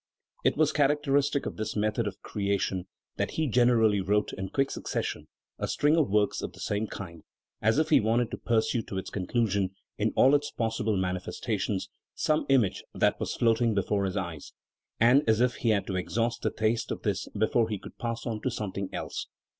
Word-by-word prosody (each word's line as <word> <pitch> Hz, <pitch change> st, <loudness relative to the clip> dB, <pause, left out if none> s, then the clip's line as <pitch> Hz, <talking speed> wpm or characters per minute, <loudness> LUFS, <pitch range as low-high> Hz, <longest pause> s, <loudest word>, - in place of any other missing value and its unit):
It -, -, +2 dB
was 155 Hz, -1 st, +3 dB
characteristic 145 Hz, -1 st, +2 dB
of -, -, -5 dB
his 110 Hz, 0 st, -3 dB
method 110 Hz, +1 st, 0 dB
of 100 Hz, -, -7 dB
creation 100 Hz, -2 st, -1 dB, 0.3 s
that -, -, 0 dB
he 160 Hz, -, +2 dB
generally 115 Hz, -5 st, +4 dB
wrote 105 Hz, +2 st, +1 dB
in 95 Hz, 0 st, -4 dB
quick 135 Hz, +6 st, 0 dB
succession -, -, -3 dB, 0.3 s
a -, -, -1 dB
string 150 Hz, +2 st, +2 dB
of 160 Hz, -5 st, +2 dB
works 105 Hz, 0 st, +2 dB
of -, -, -5 dB
the -, -, -15 dB
same 105 Hz, +2 st, -1 dB
kind, 85 Hz, -6 st, -8 dB, 0.4 s
as 110 Hz, +4 st, +3 dB
if 155 Hz, 0 st, +2 dB
he -, -, +7 dB
wanted 115 Hz, +2 st, +1 dB
to -, -, -4 dB
pursue 115 Hz, 0 st, +1 dB
to 100 Hz, -, -6 dB
its 95 Hz, -, -5 dB
conclusion, 100 Hz, -1 st, 0 dB, 0.2 s
in -, -, +1 dB
all 135 Hz, -, +6 dB
its 145 Hz, 0 st, +2 dB
possible 110 Hz, -2 st, -1 dB
manifestations, 95 Hz, +2 st, -2 dB, 0.3 s
some 155 Hz, -2 st, +1 dB
image 125 Hz, -8 st, +3 dB
that -, -, +2 dB
was -, -, -2 dB
floating 115 Hz, -1 st, +2 dB
before 100 Hz, 0 st, +1 dB
his 95 Hz, +1 st, -2 dB
eyes, 85 Hz, -6 st, -5 dB, 0.5 s
and 125 Hz, +5 st, +6 dB
as 110 Hz, 0 st, +4 dB
if 125 Hz, 0 st, +2 dB
he 115 Hz, -, 0 dB
had 105 Hz, -3 st, +2 dB
to 95 Hz, -, -2 dB
exhaust 115 Hz, +6 st, -1 dB
the -, -, +1 dB
taste 110 Hz, +1 st, 0 dB
of -, -, -4 dB
this 100 Hz, -2 st, -1 dB
before 110 Hz, +2 st, +2 dB
he 105 Hz, -, -2 dB
could -, -, -12 dB
pass 115 Hz, -1 st, -3 dB
on 110 Hz, -3 st, -3 dB
to 130 Hz, -, 0 dB
something 100 Hz, -5 st, -4 dB
else. -, -, -4 dB
110 Hz, 195 wpm, -28 LUFS, 100-120 Hz, 0.5 s, he